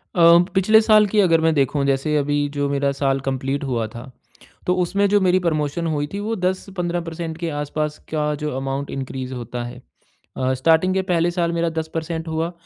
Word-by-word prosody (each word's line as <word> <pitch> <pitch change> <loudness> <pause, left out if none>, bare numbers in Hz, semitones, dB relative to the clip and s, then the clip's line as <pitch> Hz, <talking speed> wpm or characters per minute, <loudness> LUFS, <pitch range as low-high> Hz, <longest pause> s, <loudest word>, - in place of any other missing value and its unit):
अ, - - -1 0.3
पिछले 215 +3 +5
साल 215 -1 +5
की 210 +2 +1
अगर 165 -5 +4
मैं 160 0 +3
देखूँ 140 0 +1
जैसे 140 +2 +1
अभी 145 0 0
जो 145 0 -2
मेरा 140 0 +1
साल 135 -1 0
कंप्लीट 135 +1 -2
हुआ 120 -5 -1
था, 120 +4 -10 0.6
तो 180 - +3
उसमें 195 +3 +1
जो 205 +1 +4
मेरी 185 0 +3
प्रमोशन 165 -1 -1
हुई 145 -2 -1
थी 200 - -3
वो 220 +2 -2
10 185 0 0
से 195 - -12
15 175 -1 -2
परसेंट 165 -1 -6
के 170 -1 -3
आस-पास 150 +1 -3
का 150 -1 0
जो 150 - -1
अमाउंट 135 +1 -3
इनक्रीज़ 130 -1 -5
होता 120 0 -5
है। 125 +1 -9 0.6
अ, 130 0 +1
स्टार्टिंग 165 +7 +3
के 190 - +1
पहले 175 -2 +1
साल 170 -1 0
मेरा 170 0 0 0.6
हुआ, 160 +1 -2
155 Hz, 200 wpm, -21 LUFS, 140-175 Hz, 0.6 s, पिछले